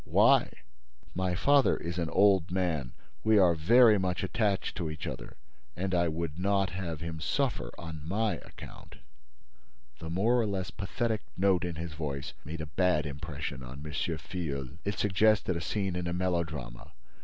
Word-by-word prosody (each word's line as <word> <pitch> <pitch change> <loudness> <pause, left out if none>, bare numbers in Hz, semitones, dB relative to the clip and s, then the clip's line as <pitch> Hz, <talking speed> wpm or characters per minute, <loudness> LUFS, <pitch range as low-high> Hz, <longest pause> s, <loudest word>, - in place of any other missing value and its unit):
"Why?" - - +4 0.6
"My 90 -1 -1
father 140 +8 +4
is 85 +1 -4
an 85 -1 -1
old 95 -2 +4
man. 85 -9 -1 0.3
We 110 -1 +5
are 90 -4 +6
very 110 +7 +6
much 90 -1 -1
attached 100 0 0
to 85 -3 -2
each 75 -2 -6
other—and 65 +9 -7
I 85 -1 +3
would 80 0 -3
not 100 0 +1
have 85 -4 -4
him 85 -1 -5
suffer 135 - -1
on 80 -2 -7
my 105 +4 0
account." - - -12 1.0
The 80 - -6
more 110 +9 +2
or 110 - 0
less 95 -2 -3
pathetic 110 +2 -2 0.2
note 95 -1 +3
in 90 -2 -3
his 80 0 -5
voice 70 -3 -4
made 80 +3 -6
a - - -3
bad 75 0 +1
impression 70 -1 -5
on 65 +4 -9
M. 75 - -5
Filleul. 80 -3 -3
It 100 - -2
suggested 105 -1 +3
a 85 - -2
scene 95 +1 -2
in 90 -1 -2
a 85 - -1
melodrama. 80 -9 -3
90 Hz, 165 wpm, -30 LUFS, 80-95 Hz, 1.0 s, are